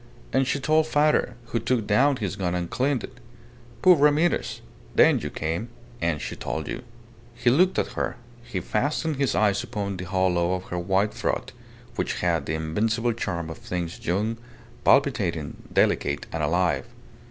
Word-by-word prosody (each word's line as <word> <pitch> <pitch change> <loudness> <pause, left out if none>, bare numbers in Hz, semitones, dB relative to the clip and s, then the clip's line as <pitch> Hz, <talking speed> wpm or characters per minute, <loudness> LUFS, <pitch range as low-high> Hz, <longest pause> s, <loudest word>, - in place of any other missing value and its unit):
And 135 0 +3
she 140 - 0
told 155 +3 +3
father, 150 -4 +2
who 115 - 0
took 115 -1 0
down 130 +8 +4
his 100 -6 -3
gun 90 -3 -1
and 90 -1 -3
cleaned 130 -2 0
it. 130 - -10 0.6
Poor 185 -1 +8
Ramirez! 150 +3 +2 0.3
Then - - +6
you - - -4
came, 85 +9 -3 0.3
and 85 -3 0
she - - -5
told 80 -2 -4
you." 125 - -4 0.5
He 120 0 +2
looked 180 +8 +4
at - - +1
her. - - -2 0.3
He 100 -6 -4
fastened 145 - -1
his 135 -5 +1
eyes 100 -2 +2
upon 100 -4 -4
the 90 - -5
hollow 90 -1 +1
of 90 - -5
her 90 - -1
white 95 +4 +1
throat, - - -2 0.5
which - - -1
had 85 -5 +1
the 80 - -1
invincible 110 +9 0
charm 85 -7 -3
of - - -9
things 85 -1 -4
young, 105 +6 0 0.5
palpitating, - - +2
delicate, - - +1
and 80 - -2
alive. 85 +3 +1
105 Hz, 165 wpm, -25 LUFS, 90-130 Hz, 0.6 s, Poor